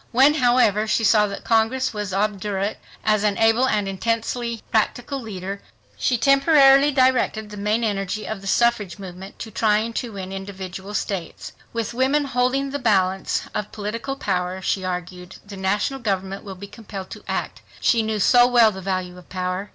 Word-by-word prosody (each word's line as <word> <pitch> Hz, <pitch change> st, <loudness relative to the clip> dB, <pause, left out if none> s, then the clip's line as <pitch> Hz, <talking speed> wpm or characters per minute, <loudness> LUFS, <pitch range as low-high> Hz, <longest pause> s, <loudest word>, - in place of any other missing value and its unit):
When, 270 Hz, +5 st, +5 dB
however, 240 Hz, -6 st, +3 dB
she 225 Hz, -, +1 dB
saw 210 Hz, -1 st, +4 dB
that 200 Hz, -, -7 dB
Congress 230 Hz, +3 st, +1 dB
was 210 Hz, -2 st, -4 dB
obdurate, 200 Hz, 0 st, -1 dB, 0.3 s
as 215 Hz, -1 st, +2 dB
an 205 Hz, -1 st, +1 dB
able 225 Hz, +3 st, +4 dB
and 210 Hz, -4 st, 0 dB
intensely 230 Hz, +3 st, -2 dB
practical 245 Hz, +5 st, 0 dB
leader 200 Hz, -3 st, -6 dB, 0.3 s
she 240 Hz, -, +1 dB
temporarily 275 Hz, +2 st, +5 dB
directed 255 Hz, -5 st, +1 dB
the 210 Hz, -, -8 dB
main 210 Hz, +3 st, 0 dB
energy 205 Hz, -1 st, -2 dB
of 220 Hz, -3 st, -5 dB
the 195 Hz, -, -8 dB
suffrage 225 Hz, -4 st, +1 dB
movement 190 Hz, 0 st, -10 dB
to 220 Hz, -, -7 dB
trying 215 Hz, +2 st, +1 dB
to 235 Hz, -3 st, -8 dB
win 190 Hz, -1 st, -6 dB
individual 195 Hz, 0 st, -7 dB
states. 190 Hz, -6 st, -4 dB, 0.2 s
With 230 Hz, -1 st, -3 dB
women 270 Hz, +4 st, +2 dB
holding 265 Hz, +1 st, 0 dB
the 285 Hz, -, -3 dB
balance 195 Hz, -5 st, +1 dB
of 210 Hz, -, -3 dB
political 225 Hz, +6 st, -4 dB
power, 185 Hz, -6 st, -2 dB
she 190 Hz, 0 st, -1 dB
argued, 180 Hz, 0 st, -5 dB
the 200 Hz, 0 st, -9 dB
national 205 Hz, +8 st, -1 dB
government 195 Hz, -4 st, -2 dB
will 195 Hz, -2 st, -8 dB
be 195 Hz, +2 st, -9 dB
compelled 200 Hz, -2 st, -9 dB
to -, -, -9 dB
act. -, -, -3 dB, 0.2 s
She 230 Hz, -, +3 dB
knew 220 Hz, -1 st, -2 dB
so 245 Hz, +4 st, +6 dB
well 240 Hz, -3 st, +5 dB
the 190 Hz, -1 st, -8 dB
value 185 Hz, -1 st, -3 dB
of 180 Hz, -, -18 dB
power. 185 Hz, +2 st, -3 dB
210 Hz, 175 wpm, -22 LUFS, 195-240 Hz, 0.3 s, so